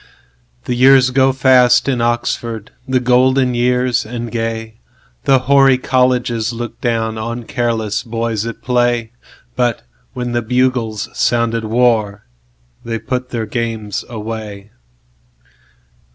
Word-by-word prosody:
The -, -, -1 dB
years 130 Hz, +1 st, +5 dB
go 135 Hz, +1 st, +3 dB
fast 125 Hz, -1 st, +4 dB
in 130 Hz, -3 st, 0 dB
Oxford, 115 Hz, -2 st, -2 dB, 0.2 s
The 130 Hz, -1 st, +2 dB
golden 125 Hz, +1 st, +3 dB
years 125 Hz, 0 st, +1 dB
and 120 Hz, 0 st, -6 dB
gay, 115 Hz, -1 st, -4 dB, 0.5 s
The 135 Hz, -, +5 dB
hoary 135 Hz, -1 st, +5 dB
Colleges 125 Hz, -3 st, +1 dB
look 120 Hz, -1 st, -7 dB
downOn 115 Hz, 0 st, -2 dB
careless 115 Hz, -3 st, -1 dB
boys 115 Hz, -2 st, -3 dB
at 115 Hz, -, -8 dB
play. 120 Hz, -2 st, +1 dB, 0.4 s
But 120 Hz, -2 st, 0 dB, 0.3 s
when 125 Hz, -1 st, -4 dB
the 120 Hz, 0 st, 0 dB
bugles 125 Hz, -2 st, 0 dB
sounded 115 Hz, -1 st, 0 dB
warThey 100 Hz, -, -2 dB
put 125 Hz, 0 st, -3 dB
their 115 Hz, -3 st, -3 dB
games 110 Hz, -2 st, -3 dB
away. 110 Hz, -2 st, -7 dB
120 Hz, 110 wpm, -17 LUFS, 110-125 Hz, 0.5 s, years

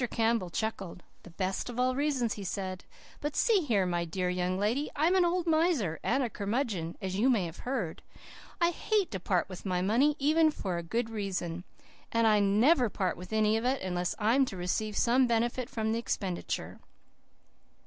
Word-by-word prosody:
Campbell 225 Hz, -5 st, +1 dB
chuckled. 190 Hz, -3 st, -4 dB, 0.2 s
"The -, -, -13 dB
best 185 Hz, +5 st, -3 dB
of 245 Hz, 0 st, -5 dB
all 255 Hz, 0 st, +2 dB
reasons," 270 Hz, -5 st, 0 dB
he 205 Hz, -, -7 dB
said. 185 Hz, -1 st, -4 dB, 0.3 s
"But 295 Hz, 0 st, -3 dB
see 450 Hz, -4 st, +4 dB
here, 225 Hz, -, +1 dB
my 175 Hz, -1 st, 0 dB
dear 180 Hz, +2 st, -2 dB
young 180 Hz, 0 st, -1 dB
lady, 230 Hz, +9 st, 0 dB
I'm 320 Hz, +5 st, +3 dB
an 375 Hz, -1 st, +4 dB
old 350 Hz, 0 st, +1 dB
miser 315 Hz, -, +1 dB
and 260 Hz, +1 st, +1 dB
curmudgeon, 200 Hz, -6 st, -2 dB
as 190 Hz, 0 st, -3 dB
you 250 Hz, +5 st, +4 dB
may 220 Hz, -8 st, +2 dB
have 165 Hz, -1 st, -8 dB
heard. 210 Hz, -12 st, -2 dB, 0.6 s
I 340 Hz, 0 st, +3 dB
HATE 410 Hz, +1 st, 0 dB
to 190 Hz, -, -3 dB
part 180 Hz, 0 st, 0 dB
with 185 Hz, -2 st, -9 dB
my 180 Hz, -2 st, -1 dB
money, 255 Hz, +9 st, +3 dB
even 310 Hz, +3 st, +4 dB
for 185 Hz, -, -3 dB
a -, -, -3 dB
good 225 Hz, +7 st, -2 dB
reason. 185 Hz, -5 st, -3 dB, 0.5 s
And 230 Hz, 0 st, +2 dB
I 215 Hz, -1 st, +5 dB
NEVER 230 Hz, +6 st, +4 dB
part 185 Hz, -2 st, -1 dB
with 180 Hz, +3 st, -10 dB
any 215 Hz, 0 st, +3 dB
of 225 Hz, -, -3 dB
it, 260 Hz, -2 st, 0 dB
unless 180 Hz, +1 st, -2 dB
I 215 Hz, +1 st, +2 dB
am 270 Hz, +1 st, +4 dB
to 195 Hz, -, -7 dB
receive 200 Hz, +4 st, -2 dB
some 250 Hz, +2 st, +4 dB
benefit 235 Hz, +2 st, 0 dB
from 220 Hz, -1 st, -2 dB
the 225 Hz, -, 0 dB
expenditure. 190 Hz, -6 st, -3 dB
220 Hz, 190 wpm, -30 LUFS, 185-260 Hz, 0.6 s, I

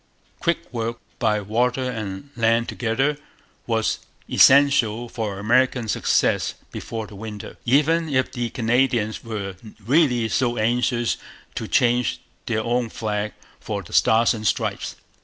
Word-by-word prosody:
Quick 170 Hz, -3 st, -1 dB
work, 115 Hz, 0 st, -2 dB, 0.2 s
by 105 Hz, -2 st, +1 dB
water 120 Hz, +5 st, 0 dB
and 110 Hz, -1 st, -5 dB
land 115 Hz, 0 st, +2 dB
together, 135 Hz, +5 st, 0 dB, 0.5 s
was 110 Hz, -2 st, 0 dB, 0.3 s
essential 130 Hz, -5 st, +5 dB
for 110 Hz, -4 st, -4 dB
American 120 Hz, +3 st, +2 dB
success -, -, +1 dB, 0.2 s
before 115 Hz, -1 st, -5 dB
the 105 Hz, -, -13 dB
winter, 105 Hz, 0 st, -8 dB
even 155 Hz, +6 st, +3 dB
if 130 Hz, -2 st, +1 dB
the 120 Hz, -2 st, -3 dB
Canadians 120 Hz, -2 st, +1 dB
were 100 Hz, -4 st, -5 dB, 0.3 s
really 125 Hz, -4 st, +3 dB
so 120 Hz, +1 st, 0 dB
anxious 120 Hz, +1 st, +1 dB, 0.4 s
to -, -, -4 dB
change 120 Hz, 0 st, +2 dB, 0.3 s
their 110 Hz, -1 st, 0 dB
own 120 Hz, 0 st, 0 dB
flag 105 Hz, -1 st, -3 dB, 0.3 s
for -, -, -4 dB
the -, -, -13 dB
Stars 115 Hz, +1 st, +4 dB
and 110 Hz, -2 st, -3 dB
Stripes. -, -, -1 dB
115 Hz, 130 wpm, -23 LUFS, 110-125 Hz, 0.5 s, essential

